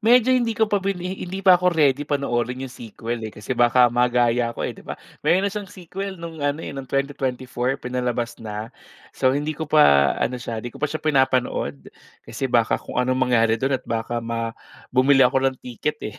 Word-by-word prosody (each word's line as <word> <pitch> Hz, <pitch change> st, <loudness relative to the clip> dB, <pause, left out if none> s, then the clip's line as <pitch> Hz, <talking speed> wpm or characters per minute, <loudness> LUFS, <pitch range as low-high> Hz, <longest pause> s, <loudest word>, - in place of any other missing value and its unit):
medyo 245 Hz, +2 st, +5 dB
hindi 240 Hz, -3 st, +2 dB
ko 220 Hz, -1 st, +1 dB
pa 205 Hz, -, +3 dB
bini 190 Hz, -1 st, -3 dB
hindi 190 Hz, +2 st, -5 dB
pa 185 Hz, -2 st, +7 dB
ako 180 Hz, 0 st, +2 dB
ready 145 Hz, -3 st, +3 dB
panoorin 125 Hz, -3 st, -1 dB
yung 130 Hz, -, -8 dB
sequel 115 Hz, 0 st, -6 dB
eh, 110 Hz, -, -8 dB
kasi 105 Hz, -, -11 dB
baka 120 Hz, +1 st, +5 dB
magaya 120 Hz, -1 st, +2 dB
ko -, -, -5 dB
eh -, -, -1 dB
di -, -, -14 dB
ba. -, -, -4 dB, 0.3 s
Meron 185 Hz, +5 st, +3 dB
siyang 205 Hz, 0 st, -5 dB
sequel 190 Hz, +1 st, -6 dB
no'ng 165 Hz, -1 st, -8 dB
ano 145 Hz, +2 st, 0 dB
eh, -, -, -5 dB
no'ng 135 Hz, -1 st, -6 dB
2024 130 Hz, -1 st, -2 dB
pinalabas 125 Hz, -2 st, -2 dB
na. 105 Hz, +1 st, -6 dB, 0.4 s
So, 130 Hz, -1 st, +2 dB
hindi 150 Hz, +1 st, -2 dB
ko 160 Hz, -, -3 dB
pa 70 Hz, -, +5 dB
ano 125 Hz, -, -1 dB
siya, 115 Hz, -2 st, -5 dB
hindi 120 Hz, -, -5 dB
ko -, -, -13 dB
pa 150 Hz, -, 0 dB
siya 155 Hz, -, -4 dB
pinapanood 130 Hz, -, 0 dB, 0.3 s
kasi 115 Hz, +4 st, -4 dB
baka 115 Hz, -2 st, +3 dB
kung -, -, -10 dB
anong 130 Hz, +1 st, 0 dB
mangyari 115 Hz, -2 st, +3 dB
do'n 135 Hz, +3 st, 0 dB
at -, -, -26 dB
baka 115 Hz, +1 st, -2 dB
ma 115 Hz, 0 st, -3 dB, 0.4 s
bumili 135 Hz, +1 st, +5 dB
ako 135 Hz, +1 st, +1 dB
ng 130 Hz, -, -13 dB
ticket 150 Hz, +5 st, -3 dB
eh 105 Hz, -, -7 dB
130 Hz, 205 wpm, -23 LUFS, 120-155 Hz, 0.4 s, pa